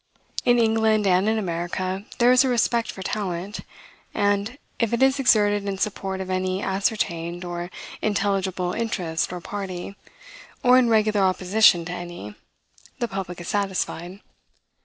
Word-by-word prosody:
In 245 -1 +5
England 220 -2 +3
and 190 +2 +3
in 220 - +1
America 185 +1 -3
there 240 +1 +5
is 255 +1 +6
a 265 - +1
respect 235 -1 +1
for 190 - -8
talent; 195 0 -3 0.6
and, 205 +4 0 0.2
if 230 -1 0
it 235 - +3
is 270 +1 +3
exerted 205 -5 +3
in 195 -1 -2
support 190 -1 -2
of 190 0 -5
any 185 0 -1
ascertained 175 -3 -1
or 175 0 -5 0.3
intelligible 195 -3 0
interest 180 -8 -2
or 180 - -5
party, 195 0 -6 0.7
or 250 0 +7
in 245 -2 +3
regular 215 -2 +3
opposition 185 -1 +4
to 175 - -5
any, 175 -12 -7 0.6
the 240 - -1
public 190 -4 -5
is 175 - -8
satisfied. 190 -2 -2
195 Hz, 145 wpm, -24 LUFS, 180-220 Hz, 0.7 s, or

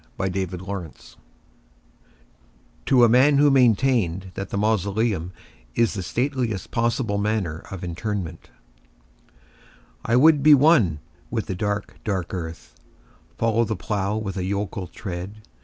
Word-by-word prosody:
The 95 0 -1
Traveller 95 -1 -4
heart 95 -5 -8 1.7
(To 130 -3 +5
a - - +8
Man 130 +5 +5
who 145 0 +5
maintained 115 -8 +2
that 95 - -5
the - - -3
Mausoleum 105 -3 0 0.4
is 115 -2 +2
the 95 - -4
Stateliest 120 0 -2
Possible 115 -3 0
Manner 100 -6 -1
of 95 -2 -7
Interment) 90 0 -5 1.5
I 115 - +1
would 150 +3 +6
be 150 +1 +8
one 130 - +4 0.3
with - - -2
the - - -4
dark, 105 +2 -3
dark 95 -5 -3
earth:— 80 -8 -6 0.6
Follow 115 0 +2
the 110 -1 -2
plough 105 -1 -2
with 100 -3 -4
a 90 - -2
yokel 100 -1 -3
tread. 95 +5 -7
105 Hz, 130 wpm, -23 LUFS, 95-115 Hz, 1.7 s, a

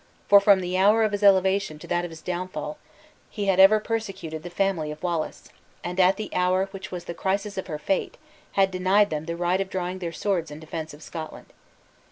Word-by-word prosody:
for, 200 - +8
from 200 -1 +5
the 180 +1 -1
hour 210 +4 +5
of 215 - +1
his 205 0 -2
elevation 190 -4 +3
to - - -12
that 175 0 0
of 175 - -4
his 160 -1 -12
downfall, 185 +11 -4 0.5
he 205 - -4
had 190 -1 +2
ever 200 +3 +8
persecuted 195 -8 -4
the 175 - -7
family 175 -4 0
of 150 +2 -8
Wallace; 170 -3 -3 0.3
and, 180 +1 -4
at 185 +1 +5
the 215 - -5
hour 185 +1 +2
which 195 -1 -8
was 175 -1 -6
the 170 - -5
crisis 200 +3 -2
of 190 - -4
her 155 -4 -4
fate, 185 +6 -2 0.4
had 195 -1 +3
denied 190 +3 +3
them 155 0 -3
the 170 0 -4
right 175 +2 +1
of 195 - -3
drawing 185 0 -3
their 170 -2 -4
swords 170 -2 -1
in 150 +1 -9
defense 160 -1 -6
of 150 - -15
Scotland. 160 -2 -8
185 Hz, 220 wpm, -25 LUFS, 170-195 Hz, 0.5 s, for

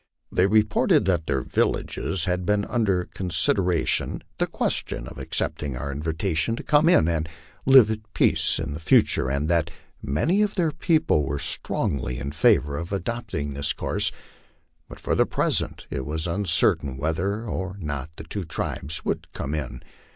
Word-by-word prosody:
They 90 - +3
reported 105 -3 +3
that 85 -4 0
their 65 -3 0
villages 95 -4 -1
had 90 0 -1
had 105 0 +2
under 100 -7 +1
consideration 90 0 0 0.2
the - - +1
question - - -1
of - - -9
accepting 70 -4 -2
our 70 +3 -4
invitation 80 +7 -1
to - - -7
come 150 +2 +4
in 80 - +5
and 80 -1 -1 0.4
live 130 -5 +8
at 110 0 -6
peace - - +2
in 80 -2 -3
the 75 - -6
future, 70 -4 +3
and 70 +3 -1
that 85 -1 +2 0.3
many 150 - +1
of 210 -1 0
their 170 -5 +1
people 160 - +2
were 70 +1 -2
strongly 65 -3 -2
in 70 +1 -4
favor 70 -1 +3
of 85 +3 -5
adopting 100 -7 -3
this 70 +1 -1
course, - - -1 0.8
but - - -10
for - - -1
the - - +3
present - - 0
it 65 - -3
was 80 +3 -3
uncertain 85 -7 +1
whether 90 - -1
or 95 -2 -4
not 75 -5 -4
the - - -9
two 95 +5 -5
tribes 80 -1 -4
would - - -3
come 70 - -4
in. 65 -5 -4
85 Hz, 165 wpm, -25 LUFS, 75-105 Hz, 0.8 s, live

